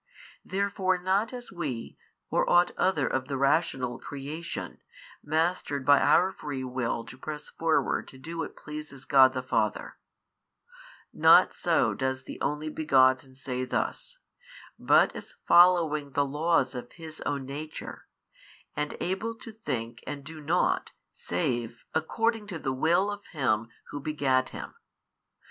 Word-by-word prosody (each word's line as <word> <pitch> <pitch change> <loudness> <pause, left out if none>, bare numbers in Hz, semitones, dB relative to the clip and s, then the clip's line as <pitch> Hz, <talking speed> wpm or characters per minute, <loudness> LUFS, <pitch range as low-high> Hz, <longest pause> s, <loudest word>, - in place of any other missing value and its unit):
Therefore 195 -1 0
not 190 +5 +1
as 245 -1 -8
WE, 150 -11 -5 0.4
or - - +2
ought 175 0 +5
other 160 -7 +2
of 130 +1 -1
the 135 -1 -2
rational 135 -3 +1
creation, 145 +4 -6 0.4
mastered 155 -3 -1
by 145 0 +7
our 185 +2 +4
free 145 -8 -5
will 125 -2 -2
to 125 - -12
press 150 0 -7
forward 165 -1 0
to 130 - -13
do 165 +5 -7
what - - -4
pleases 150 -3 -9
God 130 -1 +6
the 130 -1 -3
Father; 130 - -1 1.1
not - - +6
so - - +2
does 130 0 -2
the - - -9
Only 150 +1 -1
Begotten 130 -4 +3
say 130 -1 -4
thus, - - -3 0.6
but - - +4
as - - -9
following 165 -5 +5
the 145 - +2
laws 150 -1 +1
of 125 -1 -7
His 160 -2 -10
own 140 -2 -2
Nature 150 +3 -7 0.7
and 150 0 -3
able 205 +6 -2
to 225 0 -10
think 120 - -5
and 140 -1 -5
do 155 +1 -9
nought 165 +5 +1 0.2
save 115 +5 -3
according 225 +7 0
to 185 -5 -5
the 135 -4 -2
Will 170 +9 +2
of 205 0 -7
Him 115 -7 +1 0.2
Who 145 - -4
begat 135 -3 +1
Him. - - -8
150 Hz, 140 wpm, -28 LUFS, 130-170 Hz, 1.1 s, by